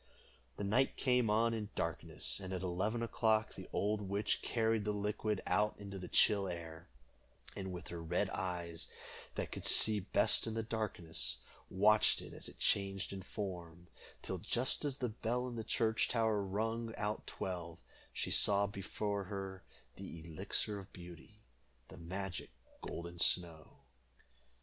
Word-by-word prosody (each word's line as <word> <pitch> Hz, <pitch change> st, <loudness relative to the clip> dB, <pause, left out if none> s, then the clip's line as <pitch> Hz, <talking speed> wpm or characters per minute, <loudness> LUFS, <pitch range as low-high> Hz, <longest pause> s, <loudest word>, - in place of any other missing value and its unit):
The -, -, -3 dB
night 120 Hz, +7 st, +2 dB
came 125 Hz, -4 st, +3 dB
on 115 Hz, +2 st, +3 dB
in 105 Hz, -2 st, -3 dB
darkness, 85 Hz, -7 st, -1 dB
and 95 Hz, -1 st, -6 dB
at 95 Hz, 0 st, -3 dB
eleven 100 Hz, +6 st, 0 dB
o'clock 110 Hz, -1 st, +2 dB
the -, -, -9 dB
old 105 Hz, +1 st, 0 dB
witch 100 Hz, +1 st, 0 dB
carried 115 Hz, -2 st, +1 dB
the 105 Hz, -, 0 dB
liquid 105 Hz, 0 st, -1 dB
out 105 Hz, 0 st, +2 dB
in 100 Hz, -1 st, -8 dB
the 95 Hz, -2 st, -6 dB
chill 100 Hz, 0 st, +4 dB
air, 85 Hz, -2 st, -7 dB, 0.7 s
and 95 Hz, -1 st, -4 dB
with 90 Hz, -3 st, -7 dB
her 85 Hz, -1 st, -5 dB
red 90 Hz, +4 st, 0 dB
eyes, 85 Hz, -3 st, -2 dB, 0.5 s
that -, -, -3 dB
could -, -, -5 dB
see 110 Hz, -1 st, +8 dB
best 95 Hz, -, +3 dB
in 110 Hz, -, -3 dB
the 115 Hz, -, -1 dB
darkness, 110 Hz, -7 st, -1 dB, 0.3 s
watched 105 Hz, +3 st, +5 dB
it -, -, -8 dB
as -, -, -6 dB
it -, -, -14 dB
changed 100 Hz, -1 st, 0 dB
in 95 Hz, -, -5 dB
form, 90 Hz, -4 st, -6 dB, 0.3 s
till, -, -, -3 dB
just 125 Hz, +5 st, +1 dB
as 140 Hz, -2 st, -1 dB
the 125 Hz, -3 st, -1 dB
bell 120 Hz, +3 st, -1 dB
in 120 Hz, -, -5 dB
the 115 Hz, -, -3 dB
church 110 Hz, 0 st, +1 dB
tower 110 Hz, -3 st, +2 dB
rung 115 Hz, +4 st, -2 dB
out 105 Hz, +1 st, -2 dB
twelve, 85 Hz, -3 st, -4 dB, 0.3 s
she -, -, -2 dB
saw 100 Hz, -1 st, +5 dB
before 100 Hz, 0 st, -3 dB
her 95 Hz, -1 st, -5 dB, 0.3 s
the 85 Hz, -, -8 dB
Elixir 85 Hz, +6 st, -2 dB
of 100 Hz, -, -12 dB
Beauty, 90 Hz, +4 st, -12 dB, 0.5 s
the -, -, -11 dB
magic 90 Hz, +1 st, -4 dB, 0.3 s
golden 85 Hz, 0 st, -6 dB
snow. 85 Hz, -3 st, +1 dB
100 Hz, 155 wpm, -36 LUFS, 90-110 Hz, 0.7 s, see